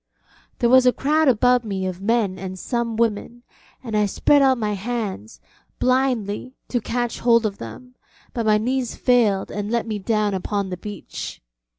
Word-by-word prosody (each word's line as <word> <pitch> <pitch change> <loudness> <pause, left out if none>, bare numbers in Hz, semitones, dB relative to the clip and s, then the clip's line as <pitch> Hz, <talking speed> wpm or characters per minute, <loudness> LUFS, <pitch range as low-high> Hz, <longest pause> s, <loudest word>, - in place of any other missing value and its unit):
There 235 - +2
was 260 -1 +6
a - - +7
crowd 305 +4 +1
about 250 0 +4
me 195 -3 -3
of 185 0 -4
men 205 -3 0
and 185 0 -6
some 235 +3 -2
women, 230 +1 -1 0.4
and 225 -4 -4
I 210 -1 +3
spread 285 +8 +3
out 265 -1 +4
my 210 -2 -1
hands, 200 - -4 0.4
blindly, 255 -2 0
to 245 - 0
catch 240 +2 -2
hold 235 -1 +4
of 200 -2 -3
them, 250 - -9 0.4
but 230 -2 -2
my 210 0 +5
knees 250 +2 -1
failed 225 -6 +2
and 205 0 -4
let 235 +1 0
me 215 -2 -3
down 210 0 0
upon 195 +1 -2
the 180 - -3
beach. 205 0 -7
225 Hz, 175 wpm, -22 LUFS, 205-245 Hz, 0.4 s, a